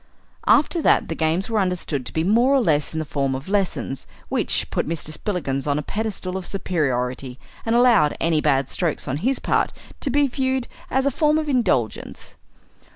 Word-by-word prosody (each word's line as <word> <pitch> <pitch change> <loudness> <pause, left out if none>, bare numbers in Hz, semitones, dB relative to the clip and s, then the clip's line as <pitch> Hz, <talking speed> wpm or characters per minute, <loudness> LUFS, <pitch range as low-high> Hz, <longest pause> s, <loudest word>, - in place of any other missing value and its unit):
After 310 +3 +4
that - - +3
the - - -1
games 160 +4 0
were 225 -2 0
understood 175 -8 -1
to - - -4
be 160 - 0
more 235 +9 +4
or - - +5
less 150 - +1
in 160 - -5
the 155 - -2
form 140 -2 -1
of 135 +5 -7
lessons, 190 -8 -1 0.2
which - - 0
put - - -1
Mr. 160 -2 -3
Spillikins 150 -8 -2
on 145 0 +1
a 150 - -2
pedestal 200 -3 -3
of 185 - -5
superiority, 130 -9 -2 0.3
and 225 - +2
allowed 235 -11 +4
any 165 -2 +2
bad 135 -3 +2
strokes 170 0 -2
on 130 - -1
his 255 - 0
part - - +1 0.3
to 285 - -1
be 285 +2 +3
viewed 260 -1 -1 0.2
as 265 +1 +1
a 280 - +3
form 300 +3 +2
of 310 -1 -1
indulgence. 230 - -1
180 Hz, 190 wpm, -22 LUFS, 145-245 Hz, 0.3 s, or